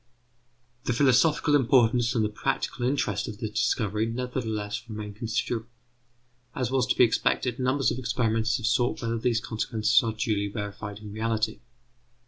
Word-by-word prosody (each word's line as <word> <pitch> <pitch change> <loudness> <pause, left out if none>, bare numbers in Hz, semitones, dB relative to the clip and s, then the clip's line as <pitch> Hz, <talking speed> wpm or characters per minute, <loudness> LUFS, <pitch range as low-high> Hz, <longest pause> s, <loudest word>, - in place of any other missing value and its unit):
The 125 - +1
philosophical 145 +4 +3
importance 120 -2 +3
and 110 -2 +2
the - - -1
practical 125 +2 -2
interest 110 -7 0
of 105 - -6
the 110 - -3
discovery 105 0 0
nevertheless 115 -3 -3
remain 105 -1 -6
considerable. 115 +1 -3 0.9
As 125 -2 -1
was 130 -2 +2
to - - +1
be - - +6
expected, 120 +1 +1
numbers 130 +2 +1
of 125 - -3
experimenters 115 -1 0
have 120 - -5
sought 120 +2 +1
whether 115 0 -1
these 115 -1 +1
consequences 115 +2 +1
are 115 -3 -2
duly 105 -2 -1
verified 105 0 -6
in 105 -1 -9
reality. 110 0 -1
115 Hz, 150 wpm, -27 LUFS, 110-125 Hz, 0.9 s, be